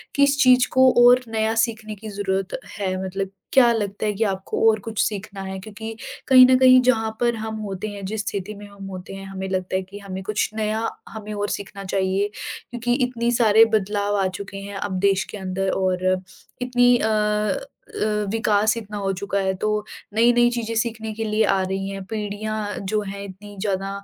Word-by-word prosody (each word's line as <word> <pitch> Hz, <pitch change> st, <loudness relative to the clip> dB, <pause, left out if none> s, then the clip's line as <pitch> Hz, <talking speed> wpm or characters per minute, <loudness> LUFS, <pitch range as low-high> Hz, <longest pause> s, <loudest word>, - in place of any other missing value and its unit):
किस 280 Hz, 0 st, +4 dB
चीज़ 255 Hz, 0 st, +6 dB
को 260 Hz, 0 st, +6 dB
और 250 Hz, +1 st, +7 dB
नया 220 Hz, 0 st, 0 dB
सीखने 220 Hz, -2 st, -7 dB
की 215 Hz, +2 st, -9 dB
ज़रूरत 195 Hz, 0 st, -2 dB, 0.2 s
है? 190 Hz, -2 st, -1 dB
मतलब 195 Hz, +1 st, -3 dB, 0.2 s
क्या 245 Hz, -3 st, +6 dB
लगता 205 Hz, -1 st, -2 dB
है 210 Hz, -, +1 dB
कि 215 Hz, +3 st, 0 dB
आपको 190 Hz, -2 st, -2 dB
और 215 Hz, -1 st, +2 dB
कुछ 225 Hz, -2 st, -5 dB
सीखना 205 Hz, -1 st, -6 dB
है 190 Hz, 0 st, -5 dB
क्योंकि 220 Hz, +3 st, -8 dB, 0.3 s
कहीं 255 Hz, -1 st, +9 dB
न 255 Hz, 0 st, +5 dB
कहीं 255 Hz, -1 st, +8 dB
जहाँ 225 Hz, -3 st, +2 dB
पर 240 Hz, -1 st, +2 dB
हम 220 Hz, 0 st, -5 dB
होते 195 Hz, +1 st, -4 dB
हैं, 205 Hz, -1 st, -7 dB
जिस 215 Hz, +2 st, -2 dB
स्थिति 200 Hz, 0 st, -3 dB
में 205 Hz, -, -10 dB
हम 200 Hz, -1 st, -11 dB
होते 185 Hz, 0 st, -8 dB
हैं, 195 Hz, 0 st, -8 dB
हमें 190 Hz, 0 st, -5 dB
लगता 185 Hz, 0 st, -2 dB
है 190 Hz, -, +1 dB
कि 200 Hz, +2 st, -11 dB
हमें 190 Hz, -1 st, -6 dB
कुछ 210 Hz, +1 st, -1 dB
नया 220 Hz, +1 st, -1 dB, 0.2 s
हमें 215 Hz, -1 st, -7 dB
और 205 Hz, 0 st, -2 dB
सीखना 200 Hz, 0 st, -5 dB
चाहिए। 190 Hz, +1 st, 0 dB, 0.4 s
क्योंकि 240 Hz, 0 st, -1 dB
इतने 240 Hz, -1 st, -1 dB
सारे 225 Hz, -2 st, +6 dB
बदलाव 205 Hz, 0 st, 0 dB
आ 190 Hz, -, +2 dB
चुके 200 Hz, 0 st, -7 dB
हैं 200 Hz, 0 st, -7 dB
अब 195 Hz, -1 st, -3 dB
देश 195 Hz, 0 st, +3 dB
के 210 Hz, -, -6 dB
अंदर 190 Hz, 0 st, -2 dB
और 185 Hz, -1 st, 0 dB, 0.6 s
इतनी 245 Hz, 0 st, +4 dB
अ 220 Hz, -, 0 dB, 0.9 s
अ, -, -, +2 dB, 0.3 s
विकास 215 Hz, -1 st, +2 dB
इतना 210 Hz, -2 st, -6 dB
हो 195 Hz, -1 st, -1 dB
चुका 200 Hz, +1 st, -2 dB
है, 190 Hz, -1 st, 0 dB
तो 210 Hz, +2 st, -1 dB, 0.3 s
नई-नई 240 Hz, +2 st, +4 dB
चीज़ें 230 Hz, -2 st, -3 dB
सीखने 220 Hz, -1 st, -2 dB
के 225 Hz, +1 st, -4 dB
लिए 215 Hz, 0 st, +1 dB
आ 190 Hz, -, +1 dB
रही 195 Hz, +1 st, -3 dB
हैं। 195 Hz, -1 st, -6 dB
पीढ़ियाँ 215 Hz, 0 st, -3 dB
जो 215 Hz, -1 st, +1 dB
हैं 200 Hz, +1 st, -6 dB
इतनी 200 Hz, +1 st, -10 dB
ज़्यादा 195 Hz, -2 st, -1 dB
210 Hz, 195 wpm, -23 LUFS, 195-225 Hz, 0.9 s, कहीं